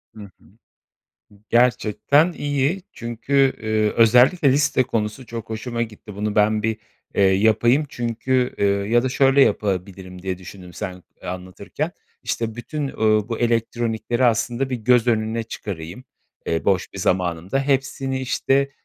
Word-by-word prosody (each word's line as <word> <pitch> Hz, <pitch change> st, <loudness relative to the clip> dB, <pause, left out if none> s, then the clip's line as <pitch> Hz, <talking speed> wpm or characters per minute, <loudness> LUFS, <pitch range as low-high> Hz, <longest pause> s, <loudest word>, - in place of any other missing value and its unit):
Hı 110 Hz, -, -10 dB
hı. 95 Hz, -3 st, -17 dB, 1.1 s
Gerçekten 125 Hz, -, +3 dB
iyi, 145 Hz, +5 st, -1 dB
çünkü, 130 Hz, +4 st, +1 dB
eee, 110 Hz, -1 st, +1 dB
özellikle 125 Hz, -, +5 dB
liste 140 Hz, -1 st, +2 dB
konusu 115 Hz, 0 st, -3 dB
çok 115 Hz, -1 st, -7 dB
hoşuma 115 Hz, +2 st, -3 dB
gitti. 105 Hz, -2 st, -8 dB
Bunu 105 Hz, +1 st, -2 dB
ben 105 Hz, 0 st, +3 dB
bir, 110 Hz, 0 st, 0 dB, 0.4 s
eee, -, -, +2 dB
yapayım 110 Hz, +8 st, +3 dB
çünkü, 125 Hz, +1 st, -1 dB
eee, 100 Hz, -, +2 dB
ya 100 Hz, +4 st, +2 dB
da 130 Hz, -, 0 dB
şöyle 135 Hz, +2 st, +3 dB
yapabilirim 95 Hz, -4 st, -2 dB
diye 95 Hz, -1 st, -3 dB
düşündüm 90 Hz, -1 st, -11 dB
sen, 90 Hz, -2 st, -6 dB, 0.2 s
eee, -, -, -7 dB
anlatırken: 90 Hz, 0 st, -5 dB, 0.3 s
İşte, 115 Hz, -1 st, -3 dB
bütün, 140 Hz, +5 st, -4 dB
ooo, 110 Hz, -4 st, +1 dB
bu 115 Hz, -, -3 dB
elektronikleri 120 Hz, +1 st, 0 dB
aslında 120 Hz, +3 st, +1 dB
bir 125 Hz, -, -1 dB
göz 120 Hz, +1 st, +3 dB
önüne 110 Hz, 0 st, 0 dB
çıkarayım, 100 Hz, -1 st, -7 dB, 0.4 s
eee, 80 Hz, -, -1 dB
boş 95 Hz, -2 st, +1 dB
bir 100 Hz, -, -8 dB
zamanımda. 90 Hz, +5 st, 0 dB
Hepsini, 135 Hz, -1 st, -1 dB
işte, 135 Hz, +1 st, +1 dB
115 Hz, 140 wpm, -22 LUFS, 100-130 Hz, 1.1 s, özellikle